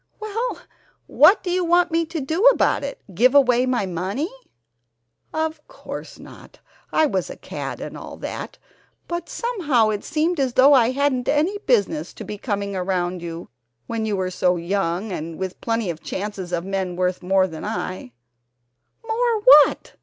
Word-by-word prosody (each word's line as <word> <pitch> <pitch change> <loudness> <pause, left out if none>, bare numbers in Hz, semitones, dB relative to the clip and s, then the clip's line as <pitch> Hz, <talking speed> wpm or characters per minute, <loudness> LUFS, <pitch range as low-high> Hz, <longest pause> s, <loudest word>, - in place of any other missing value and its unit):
"Well, 445 +3 -3 0.5
what 405 - +5
do 360 - -2
you 365 0 +1
want 350 +1 +3
me 330 0 +1
to 325 0 -4
do 315 +6 -2
about - - +4
it, 280 - -6
give 250 +9 +3
away 255 -2 +4
my 245 -5 0
money?" 190 - -3 1.0
"Of 315 -1 -2
course - - -9
not. - - -14 0.3
I 315 - +3
was 190 - -1
a - - -7
cad - - -6
and - - -7
all - - -9
that, - - -6 0.5
but 345 0 -4
somehow 310 - +1
it 210 -1 -2
seemed 320 +2 0
as 260 -3 0
though 270 +3 +6
I 240 -4 +5
hadn't 260 -1 0
any 325 +8 +1
business 370 -10 +1
to - - -8
be 210 0 -7
coming 200 -3 -3
around 180 -1 -1
you 170 0 -7 0.4
when 225 -1 -3
you 205 -2 -1
were 185 -1 -2
so 180 0 +1
young 185 +3 -2
and 165 -2 -5
with 190 -1 -5
plenty 225 -5 -1
of 160 - -10
chances 195 -2 -5
of 175 0 -2
men 190 -2 -2
worth 180 0 -1
more 190 +1 +3
than 160 -4 -7
I 185 - -4 0.5
" 120 - -28
"More 460 -1 +1
what? 300 - +6
230 Hz, 175 wpm, -22 LUFS, -, 1.0 s, though